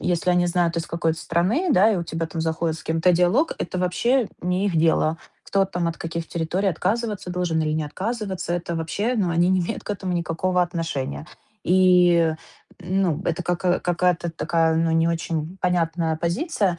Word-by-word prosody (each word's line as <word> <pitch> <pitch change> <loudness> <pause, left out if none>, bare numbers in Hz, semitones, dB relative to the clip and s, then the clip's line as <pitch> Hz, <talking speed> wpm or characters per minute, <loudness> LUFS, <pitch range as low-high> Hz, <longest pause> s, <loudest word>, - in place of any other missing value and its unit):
если 180 0 0
они 175 0 +3
знают, 175 -1 +1
из 165 - -4
какой 165 -1 0
ты 160 - -7
страны, 205 - 0
да, 215 -3 +5
и - - 0
у 175 - -2
тебя 165 0 -3
там 160 0 -5
заходит 160 0 -1
с - - -12
кем-то 165 +3 +2
диалог, 180 - +3
это 180 +2 -3
вообще 225 +7 +1
не 180 +2 0
их 180 - 0
дело. 160 0 +2 0.2
Кто 195 -1 +1
там 175 -2 -2
от 165 - -5
каких 165 0 -4
территорий 175 +4 -1
отказываться 200 +2 -2
должен 175 -3 -1
или 155 -1 0
не 155 0 -1
отказываться, 190 +2 -3
это 170 -1 -3
вообще, 200 +9 -1
ну, 195 -4 +1
они 170 +2 +2
не 185 -1 +3
имеют 175 +6 -4
к - - -5
этому 190 -2 -3
никакого 175 +2 0
отношения. 160 -5 -3 0.4
И, 180 -2 +4 0.5
ну, 180 -3 0
это 170 +1 -1
как 175 +1 0
какая-то 175 -1 +1
такая, 165 0 +1
ну, 165 0 +1
не 165 +1 +3
очень 165 +1 -3
понятная 165 -2 0
позиция, 185 - -1
175 Hz, 185 wpm, -23 LUFS, 165-185 Hz, 0.5 s, да